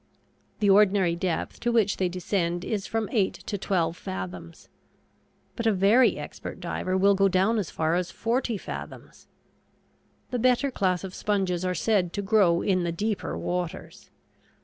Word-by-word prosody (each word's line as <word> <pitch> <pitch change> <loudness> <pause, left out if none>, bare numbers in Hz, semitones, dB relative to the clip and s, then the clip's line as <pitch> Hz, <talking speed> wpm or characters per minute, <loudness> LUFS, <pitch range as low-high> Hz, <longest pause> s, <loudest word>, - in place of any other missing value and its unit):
The 205 - +3
ordinary 195 -3 +4
depth 170 -1 -3
to 240 - 0
which 220 -4 +2
they 185 -1 0
descend 175 -1 -2
is 205 -3 -2
from 225 -1 -1
eight 205 -5 +1
to 210 - -3
twelve 175 -4 0
fathoms. 90 - -7 0.9
But 230 - -1
a - - +5
very 205 +6 +4
expert - - -8
diver 185 0 -2
will 200 +1 +5
go 195 0 +3
down 195 +4 +2
as 190 - -3
far 160 0 -1
as 180 0 0
forty 230 +1 -1
fathoms. - - -9 1.0
The 250 - -1
better 255 +3 +2
class 185 -6 0
of 190 -1 -6
sponges 190 -4 -1
are 185 0 -1
said 190 -6 +1
to 200 - -3
grow 190 -4 +3
in 185 -3 +1
the 170 - -1
deeper 205 +4 -2
waters. 175 -2 -5
190 Hz, 160 wpm, -26 LUFS, 175-210 Hz, 1.0 s, a